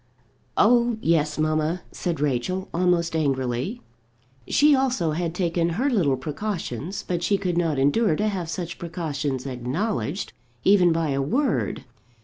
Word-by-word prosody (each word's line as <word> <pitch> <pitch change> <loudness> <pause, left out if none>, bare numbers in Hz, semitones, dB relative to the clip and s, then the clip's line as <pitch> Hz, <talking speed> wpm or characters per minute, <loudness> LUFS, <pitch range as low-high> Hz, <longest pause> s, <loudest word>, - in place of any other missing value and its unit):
"Oh, 240 -1 +4
yes, 155 -5 +1
mamma," 155 +2 0
said 170 -4 -3
Rachel, 150 +7 -1
almost 170 -1 +1
angrily. 135 - -1 0.6
She 295 +1 +5
also 260 - +1
had 165 +1 -2
taken 170 -2 +1
her 275 +4 +1
little 155 - +2
precautions, 165 - -4
but 175 -2 -1
she 200 +3 +2
could 185 -3 -2
not 165 -4 +1
endure 155 +7 +3
to 210 +6 0
have 185 -5 -3
such 170 0 -5
precautions 150 -6 -3
acknowledged, 145 - -2 0.3
even 185 -3 +5
by 165 -1 0
a 140 0 0
word. 245 - 0
170 Hz, 135 wpm, -24 LUFS, 150-195 Hz, 0.6 s, She